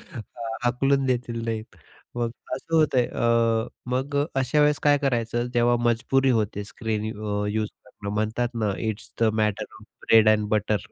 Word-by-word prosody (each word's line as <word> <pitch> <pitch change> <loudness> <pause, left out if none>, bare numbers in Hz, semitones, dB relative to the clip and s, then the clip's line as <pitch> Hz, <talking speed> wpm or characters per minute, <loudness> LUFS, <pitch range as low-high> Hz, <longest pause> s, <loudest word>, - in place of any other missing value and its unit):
हां, 115 0 -7
हाकलून 135 +3 +2
देतील 120 -2 -1
नाही. 110 -1 -2 0.5
मग 120 -1 -1 0.2
असं 165 +5 -3
होतंय 140 -6 +3
अ, 115 -1 +1 0.2
मग 135 +3 -1 0.2
अशा 135 +3 +1
वेळेस 150 0 +3
काय 145 -1 +5
करायचं, 120 -3 0
जेव्हा 120 0 +3
मजबुरी 130 +3 +2
होते 105 -3 0
स्क्रीन 110 -1 -3
अ, 105 -1 -2
यूज 110 0 -1 0.2
करणं 100 0 -7
म्हणतात 110 +3 0
ना, 105 -3 0
it's 110 -2 -4
the - - +6 0.2
matter 105 -2 0
of - - -15 0.2
bread 110 -1 +7
and 105 -1 +2
butter. 105 0 +1
115 Hz, 160 wpm, -25 LUFS, 110-125 Hz, 0.5 s, bread